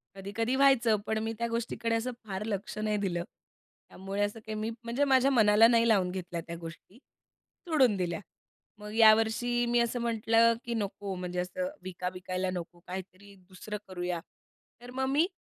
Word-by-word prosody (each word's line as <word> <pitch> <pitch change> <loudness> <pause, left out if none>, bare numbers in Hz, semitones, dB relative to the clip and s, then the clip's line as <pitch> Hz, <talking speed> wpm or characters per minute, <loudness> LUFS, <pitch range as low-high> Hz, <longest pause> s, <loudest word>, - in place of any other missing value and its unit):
कधी-कधी 215 +6 -2
व्हायचं, 265 -5 +5
पण 220 - 0
मी 225 0 -2
त्या 235 - 0
गोष्टीकडे 230 0 -2
असं 230 +3 -1 0.2
फार 195 0 -3
लक्ष 210 +1 -4
नाही 215 0 0
दिलं. 180 -4 -1 0.7
त्यामुळे 195 +2 -5
असं 205 +2 -2
काही 220 - -4
मी, 215 +1 -2
म्हणजे 235 +4 0
माझ्या 270 -1 +4
मनाला 220 -2 +6
नाही 230 0 +4
लावून 195 -5 +3
घेतल्या 180 -2 -5
त्या 170 - -5
गोष्टी, 170 +6 -11 0.7
सोडून 265 -10 +4
दिल्या. 175 -1 -2 0.6
मग 210 0 -8
यावर्षी 225 +2 +4
मी 240 0 +3
असं 235 +1 0
म्हटलं 230 0 +3
की 235 - -2
नको 200 -2 -3
म्हणजे 180 0 -4
असं 275 +10 -2
विका 180 -1 -4
विकायला 185 0 -3
नको, 175 -1 -6
काहीतरी 190 +2 -8
दुसरं 210 +3 -6
करूया. 180 -2 -3 0.6
तर 245 0 -10
मग 265 +1 -1
मी 300 +5 +3
215 Hz, 165 wpm, -30 LUFS, 185-235 Hz, 0.7 s, मनाला